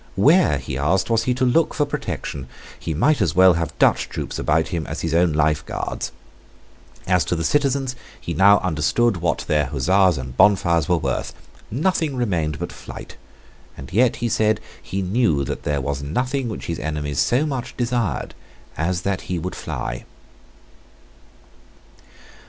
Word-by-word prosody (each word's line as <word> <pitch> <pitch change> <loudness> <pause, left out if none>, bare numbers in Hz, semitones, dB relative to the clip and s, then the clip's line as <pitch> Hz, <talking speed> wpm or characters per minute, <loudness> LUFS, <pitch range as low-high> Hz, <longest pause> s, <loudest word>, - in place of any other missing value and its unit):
Where, 150 - +4
he 70 0 -5
asked, 95 +10 +1
was 115 0 +2
he 125 - +1
to 130 +1 +1
look 155 +6 +2
for 145 - +2
protection? 70 - -5 0.3
He 80 - -3
might 145 - +2
as 85 -4 +1
well 95 0 +7
have 85 -2 -3
Dutch - - +3
troops - - -5
about 80 +2 +1
him 85 -5 -3
as - - -5
his 80 -1 -2
own 85 0 +3
Life 75 0 +1
Guards. - - -4 0.9
As 90 -1 +3
to - - -1
the 80 - -2
citizens, 135 - +1 0.2
he - - -5
now 100 +1 +6
understood 95 +6 +1
what 85 -1 -1
their 75 -3 +2
huzzas 90 +6 +3
and 65 -1 -6
bonfires 85 -4 +3
were 90 - +4
worth. 65 -5 -3 0.3
Nothing 155 - 0
remained 85 -11 -1
but - - -5
flight: - - -10 0.6
and 70 +5 -10
yet, 120 +4 +3
he 120 - -2
said, 110 -1 +2 0.2
he 95 0 -3
knew 95 - +1
that - - -4
there 75 -1 -1
was 70 +1 -3
nothing 125 - -2
which 110 - -6
his 85 - -3
enemies 75 -2 -3
so 130 +5 +2
much 135 -5 -4
desired 120 - -1 0.4
as 85 +3 -1
that 100 -2 -3
he 90 - -1
would 90 +3 -4
fly. - - -5
90 Hz, 165 wpm, -22 LUFS, 75-120 Hz, 0.9 s, well